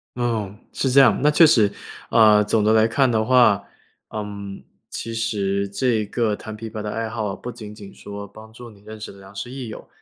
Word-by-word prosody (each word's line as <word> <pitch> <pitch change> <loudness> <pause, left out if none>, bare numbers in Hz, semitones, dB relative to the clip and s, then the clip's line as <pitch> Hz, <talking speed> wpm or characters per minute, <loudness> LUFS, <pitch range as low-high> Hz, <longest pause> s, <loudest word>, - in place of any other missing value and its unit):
哦， 115 -5 -2 0.2
是 135 - 0
这 140 - +6
样， 120 -6 +5
那 150 - +4
确 150 +2 +6
实， 110 -10 +4 0.4
呃， 105 -2 +6
总 105 +1 +1
的 110 +1 +3
来 110 0 +4
看 135 +3 +2
的 110 -2 +1
话， 115 -5 +4 0.5
嗯， 100 -2 -7 0.3
其 115 - -6
实 100 -4 -1
这 115 +1 0
个 110 -1 0
弹 110 +1 -9
琵 115 +1 -7
琶 110 -1 -6
的 105 - -4
爱 115 +1 -3
好， 110 -3 -3
不 125 - -7
仅 105 -3 -10
仅 100 -2 -12
说 100 0 -9
帮 110 +2 -14
助 120 +2 -11
你 100 -2 -19
认 110 +1 -11
识 110 - -7
了 100 - -15
良 95 0 -14
师 120 +5 -6
益 130 -2 -6
友， 110 - -9
110 Hz, 235 characters per minute, -22 LUFS, 105-120 Hz, 0.5 s, 这